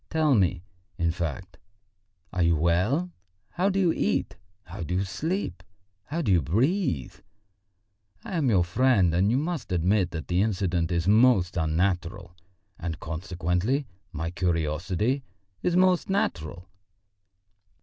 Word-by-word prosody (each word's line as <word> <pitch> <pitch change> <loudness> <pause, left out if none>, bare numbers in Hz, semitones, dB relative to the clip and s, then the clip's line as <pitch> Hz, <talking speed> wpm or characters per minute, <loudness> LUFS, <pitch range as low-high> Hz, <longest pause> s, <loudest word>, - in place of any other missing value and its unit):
Tell 155 -3 +2
me, 95 -5 +2 0.3
in 85 -2 +1
fact, 85 +2 -5 0.7
are 90 - 0
you 85 0 +4
well? 95 - +1 0.4
How 185 +3 +1
do 195 0 0
you 175 -4 +3
eat, 70 - -1 0.3
how - - -9
do 85 +2 -2
you 95 - +1
sleep, 100 - -3 0.4
how 165 +3 -3
do 110 - +1
you 90 -3 +4
breathe? 110 - 0 1.1
I 190 - -5
am 150 -6 +2
your 95 -6 +4
friend, 95 -2 +3
and 95 +4 +3
you 120 - +2
must 155 - -3
admit 90 +2 +2
that 85 -3 -6
the 90 +1 +1
incident 90 -5 0
is 85 0 0
most 105 -4 +4
unnatural, 85 +1 -1 0.4
and 85 -1 -4
consequently 90 - -1 0.3
my 80 +1 -4
curiosity 90 - -1 0.4
is 175 - 0
most 185 0 +3
natural." 90 - -2
90 Hz, 135 wpm, -26 LUFS, 85-130 Hz, 1.1 s, you